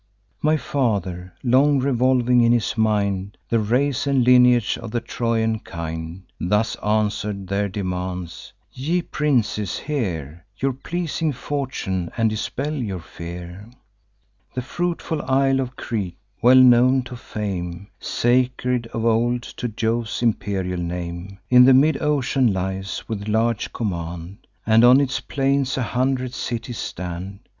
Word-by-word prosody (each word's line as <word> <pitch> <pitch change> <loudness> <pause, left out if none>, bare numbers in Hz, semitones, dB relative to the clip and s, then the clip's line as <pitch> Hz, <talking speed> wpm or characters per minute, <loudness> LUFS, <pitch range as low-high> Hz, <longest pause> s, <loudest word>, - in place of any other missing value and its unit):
My 155 +1 +3
father, 95 - -2
long 135 +3 +4
revolving 125 -2 +3
in 115 0 +4
his 120 -3 0
mind 100 -3 0
The 115 - +2
race 130 +6 +1
and 135 -3 +3
lineage 125 -2 +5
of 115 - -7
the 120 +2 -1
Trojan 115 -1 -1
kind, 80 0 -6 0.2
Thus 105 +5 +1
answer'd 105 -2 -1
their 100 +2 -1
demands: 90 -3 -5 0.2
'Ye 165 +7 -1
princes, 115 - 0
hear 85 - -3
Your 135 0 0
pleasing 165 +3 -2
fortune, 120 -10 -3
and 115 -2 +2
dispel 135 +7 -3
your 110 -10 -3
fear. 85 +5 -9 0.9
The 125 - -2
fruitful 165 +2 -2
isle 135 0 +2
of 130 -1 -3
Crete, 100 -10 -4 0.2
well 125 +1 +7
known 130 +1 +6
to 125 +1 -8
fame, 95 -5 -5
Sacred 125 0 +1
of 115 0 -1
old 120 +1 +2
to 125 - -5
Jove's 115 +1 -2
imperial 95 -5 -1
name, 85 +2 -5
In 125 0 +8
the 130 0 +7
mid 145 +2 +4
ocean 135 -4 +2
lies, 95 0 -3
with 105 -2 -4
large 110 +1 0
command, 90 0 -5 0.2
And 110 +1 +5
on 125 +2 +8
its 135 -1 0
plains 135 0 0
a 130 - 0
hundred 130 +1 -1
cities 120 -2 -4
stand. 90 +3 -6
115 Hz, 135 wpm, -22 LUFS, 95-130 Hz, 0.9 s, In